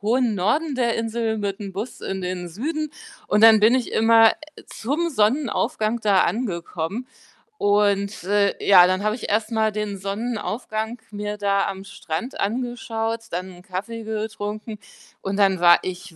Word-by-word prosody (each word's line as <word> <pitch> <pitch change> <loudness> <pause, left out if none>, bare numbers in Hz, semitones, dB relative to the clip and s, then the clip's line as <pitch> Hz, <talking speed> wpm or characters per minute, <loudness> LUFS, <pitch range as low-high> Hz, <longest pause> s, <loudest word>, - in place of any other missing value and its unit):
hohen 230 +1 +1
Norden 270 - 0
der 235 -2 +1
Insel 225 0 -1
mit'm 200 -1 -4
Bus 210 +6 -6
in 190 -1 -4
den 180 -1 -4
Süden. 300 - -3 0.4
Und 210 +1 +2
dann 225 -1 +9
bin 220 +4 +5
ich 255 -2 0
immer, 225 0 +6
äh, 305 0 -10
zum 305 +9 -2
Sonnenaufgang 230 -2 0
da 200 -3 +4
angekommen. 190 0 -3 0.5
Und, 205 0 +1
äh, 200 +1 +2
ja, 180 -3 +8
dann 185 +2 0
habe 215 +1 +1
ich - - -6
erstmal 220 +1 +1
den 210 -1 -3
Sonnenaufgang 220 +2 -3
mir 210 0 -4
da 200 -1 +1
am 195 0 -5
Strand 200 +3 -6
angeschaut, 230 0 -2
dann 185 +2 -4
'n 175 0 -14
Kaffee 210 +5 -5
getrunken. 215 0 -5 0.4
Und 195 0 -3
dann 195 -2 +3
war 175 0 +7
ich 180 -1 -7
210 Hz, 150 wpm, -23 LUFS, 195-230 Hz, 0.5 s, dann